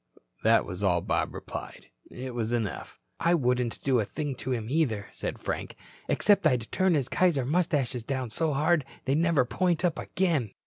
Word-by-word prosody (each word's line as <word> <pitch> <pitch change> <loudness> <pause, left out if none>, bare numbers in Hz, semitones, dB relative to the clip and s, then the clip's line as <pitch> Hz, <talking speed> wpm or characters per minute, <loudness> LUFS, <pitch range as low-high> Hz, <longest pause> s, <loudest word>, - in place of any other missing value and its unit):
"Huh." - - -24 0.2
That 115 0 +5
was 95 0 -6
all 90 -3 +3
Bob - - 0
replied. - - -8 0.2
It 130 0 -7
was 115 -1 -2
enough. 115 -5 -3 0.2
"I 170 +1 +3
wouldn't 125 -5 0
do 130 -3 +3
a - - +2
thing 145 +6 -4
to 130 - -4
him, 115 -4 -1
either," 120 -8 0
said - - -5
Frank. - - -4 0.3
"Except 200 -5 +4
I'd 125 -6 0
turn 185 -2 +3
his 135 -4 0
Kaiser 160 -8 +2
mustaches 145 -6 0
down 130 -2 -3
so 160 +6 0
hard 155 +3 +2 0.2
they'd 135 - +2
never 165 -6 +3
point 180 +5 0
up 170 -2 0
again." 160 - 0
135 Hz, 185 wpm, -28 LUFS, 120-165 Hz, 0.3 s, That